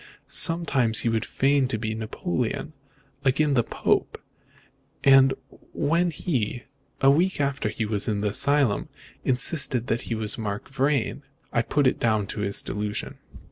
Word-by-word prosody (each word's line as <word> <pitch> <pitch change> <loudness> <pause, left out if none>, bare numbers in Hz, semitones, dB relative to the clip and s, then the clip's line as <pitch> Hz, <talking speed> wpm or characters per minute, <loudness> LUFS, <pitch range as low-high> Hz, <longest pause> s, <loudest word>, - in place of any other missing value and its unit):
Sometimes 140 -9 +3
he 115 - 0
would 115 -1 0
feign 135 0 +1
to 120 - -2
be 110 0 -3
Napoleon; 120 - -3 0.5
again 140 +2 +2
the 125 - +4
Pope; - - -1 0.9
so 135 -1 +6 0.4
when 170 +4 +1
he, 130 - -3 0.4
a 135 0 +6
week 175 +5 +1
after 140 -6 -1
he 110 +1 -3
was 105 -1 0
in 105 -2 -1
the 105 - 0
asylum, 140 0 +1 0.3
insisted 130 -1 +1
that 120 -1 -1
he 115 - -1
was 110 +1 -2
Mark 105 +4 -5
Vrain, 135 -1 0 0.3
I 120 - +3
put 145 +5 0
it 130 - +2
down 110 -3 +1
to - - -6
his 100 -1 +1
delusion." 105 +1 -4
125 Hz, 150 wpm, -25 LUFS, 110-140 Hz, 0.9 s, so